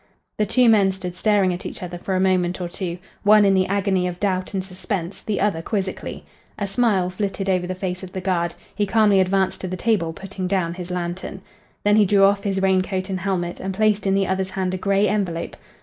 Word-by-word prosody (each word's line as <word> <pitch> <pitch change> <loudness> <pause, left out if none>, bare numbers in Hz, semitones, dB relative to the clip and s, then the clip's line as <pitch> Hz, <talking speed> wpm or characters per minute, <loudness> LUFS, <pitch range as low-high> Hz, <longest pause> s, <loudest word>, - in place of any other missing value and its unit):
The 210 - +2
two 250 +4 +4
men 205 -4 +5
stood 185 -2 -6
staring 200 -2 +2
at 175 - -6
each - - -6
other 175 -1 -6
for 190 +1 -2
a - - +1
moment 185 -1 +1
or 180 - -3
two, 175 0 -4 0.2
one 210 0 +6
in 195 - +4
the 185 -1 +2
agony 195 -2 +1
of 180 0 -5
doubt 190 -1 -1
and 190 - -1
suspense, 185 -1 -4
the 215 - -2
other 195 -5 +1
quizzically. 195 0 -4 0.3
A 205 - -2
smile 195 -3 +1
flitted 195 0 -3
over 180 -2 +1
the 185 - -3
face 185 -1 -4
of 185 -1 -8
the 190 - -4
guard; 175 -2 -1 0.2
he 205 - 0
calmly 205 0 +4
advanced 190 0 +1
to 185 - -3
the 185 +1 -4
table, 190 -5 +1
putting 190 +2 -6
down 180 -3 0
his 180 0 -7
lantern. 180 +2 -4 0.4
Then 205 +1 +5
he 210 -2 +5
drew 200 0 +4
off 200 0 +4
his 195 -1 0
rain 190 -1 +4
coat 185 0 -3
and 185 - -2
helmet 175 -2 -2
and 190 0 -4
placed 210 -1 +2
in 195 - +3
the 195 0 +2
other's 190 0 -1
hand 190 -1 -2
a - - -1
gray 200 +2 +2
envelope. 185 -5 -2
190 Hz, 230 wpm, -22 LUFS, 180-200 Hz, 0.4 s, one